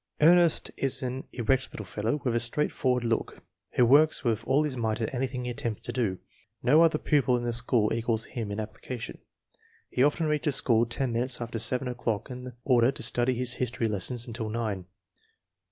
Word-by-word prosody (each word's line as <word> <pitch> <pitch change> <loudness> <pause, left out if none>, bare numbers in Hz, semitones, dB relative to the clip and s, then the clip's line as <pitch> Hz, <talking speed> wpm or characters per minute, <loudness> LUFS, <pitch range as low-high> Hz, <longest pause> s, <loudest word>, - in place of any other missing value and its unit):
Ernest 170 +1 +4
is 135 -1 0
an 130 +1 -4
erect 130 +2 0
little 105 - -7
fellow, 110 +9 -2
with 125 - +1
a - - +3
straightforward 125 0 0
look, 115 -1 -2 0.3
who 125 - +4
works 145 +6 +4
with 115 -3 0
all 140 +3 +3
his 150 -3 -3
might 110 -3 -1
at 110 +1 -3
anything 125 -1 -3
he 125 - -2
attempts 115 -2 -4
to - - -4
do. 110 -7 -1 0.5
No 150 +6 +5
other 165 -2 +4
pupil 140 -5 +2
in 120 - -4
the 120 -1 -1
school 120 -2 +2
equals 115 -1 0
him 115 -5 -5
in 100 - -4
application. 110 +2 -7 0.7
He - - -1
often 150 +4 +2
reaches 150 -1 0
school 115 -3 +3
ten 120 +1 -2
minutes 125 +2 +1
after 115 -1 -4
seven 125 +3 +1
o'clock 120 -2 -3
in 125 0 -8
order 125 -1 +4
to - - -6
study 125 +1 +2
his 125 0 0
history 120 -2 0
lesson 105 +4 0
until 115 -2 -5
nine. 105 -5 -3
125 Hz, 190 wpm, -27 LUFS, 115-130 Hz, 0.7 s, No